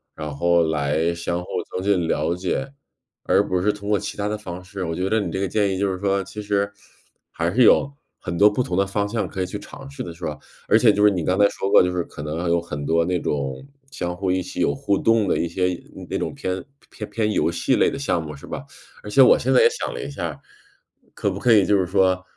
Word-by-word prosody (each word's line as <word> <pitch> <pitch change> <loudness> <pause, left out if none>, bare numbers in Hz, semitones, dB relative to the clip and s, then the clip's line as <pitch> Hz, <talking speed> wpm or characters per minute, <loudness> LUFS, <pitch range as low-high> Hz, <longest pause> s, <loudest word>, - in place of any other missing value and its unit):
然 75 -2 -6
后 85 +2 +3
来 80 +2 0
相 85 +1 -3
互 - - -14 0.3
增 90 - -2
进 95 -5 +1
了 85 - 0
解， 135 +10 -3 0.5
而 - - +2
不 90 -1 0
是 105 +2 +3
通 105 0 -7
过 105 -2 +3
其 - - -6
他 100 - -1
的 105 0 -2
方 90 -3 -8
式。 95 +1 -6
我 80 0 -3
觉 95 +1 -1
得 110 - +2
你 90 -5 -3
这 95 - -3
个 100 - 0
建 100 0 +1
议 - - -3
就 100 -1 +1
是 95 - -4
说， 100 -1 0
其 105 - -8
实 100 0 0 0.6
还 85 +1 -1
是 125 - +3
有 140 +4 +5 0.3
很 85 - -5
多 105 +2 +7
不 125 +5 -1
同 90 - -3
的 100 +1 +2
方 100 +1 -1
向 110 +1 -2
可 95 - -8
以 90 - 0
去 100 +3 -6
尝 135 +5 -11
试 140 -2 -8
的， 85 - -7
是 85 +1 -15
吧？ 75 -1 -4 0.3
而 110 - +5
且 115 -2 +6
就 105 0 +1
是 105 - +7
你 90 -4 -2
刚 90 +3 +1
才 100 0 +6
说 95 - -3
过， - - +7
就 90 - 0
是 90 -1 -1
可 75 - -9
能 80 +3 -3
有 85 0 +3
很 75 -4 -6
多 85 +1 +2
那 90 0 0
种 70 - -3 0.2
相 90 -8 -3
互 95 0 -1
一 95 - +1
起 - - -7
有 70 - +2
互 100 +6 0
动 115 -2 +2
的， - - +1
一 85 - 0
些 90 +1 -1 0.3
那 - - -3
种 - - -3
偏 95 0 -3 0.3
偏 105 - -7
偏 110 -2 0
游 80 -4 +1
戏 85 - +1
类 - - +3
的 - - -5
项 90 -12 -1
目， 75 -1 -7
是 70 - -12
吧？ - - -5 0.4
而 105 - -7
且 135 +5 +5
我 - - +7
现 130 - 0
在 125 - +6
也 - - +6
想 - - -4
了 - - -5
一 - - -5
下。 70 - -5 0.7
可 100 - -1
不 95 - -4
可 125 - +3
以 100 -3 +5
就 105 - +3
是 95 - +1
说， 95 0 +2
95 Hz, 290 characters per minute, -22 LUFS, 85-105 Hz, 0.7 s, 多